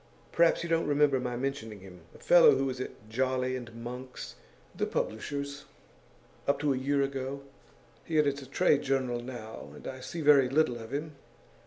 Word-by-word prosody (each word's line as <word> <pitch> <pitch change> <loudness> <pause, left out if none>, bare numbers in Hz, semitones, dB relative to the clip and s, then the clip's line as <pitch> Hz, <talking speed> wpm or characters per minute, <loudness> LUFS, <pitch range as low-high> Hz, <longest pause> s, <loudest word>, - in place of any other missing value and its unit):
Perhaps 170 0 +3
you - - -3
don't 165 -1 +2
remember 145 -2 +3
my 125 -1 -3
mentioning 115 -6 -4
him; 90 -2 -12
a - - -11
fellow 175 -5 +7
who 135 +1 0
was 130 -1 -3
at 105 -4 -8
Jolly 130 +2 0
and 120 -3 -7
Monk's, 125 +2 -7 0.4
the - - -1
publishers, 140 +5 -3 0.8
up 140 - +3
to 145 -2 +2
a - - -2
year 140 +1 +1
ago. 135 0 -4 0.6
He 160 - -2
edits 145 -2 +2
a 135 - -10
trade 140 +1 +3
journal 130 -3 0
now, 120 -3 -8
and - - -12
I 130 - -6
see 165 +6 -6
very 140 -4 +6
little 135 -4 +2
of 115 +1 -9
him. 150 +1 -4
135 Hz, 180 wpm, -30 LUFS, 125-145 Hz, 0.8 s, fellow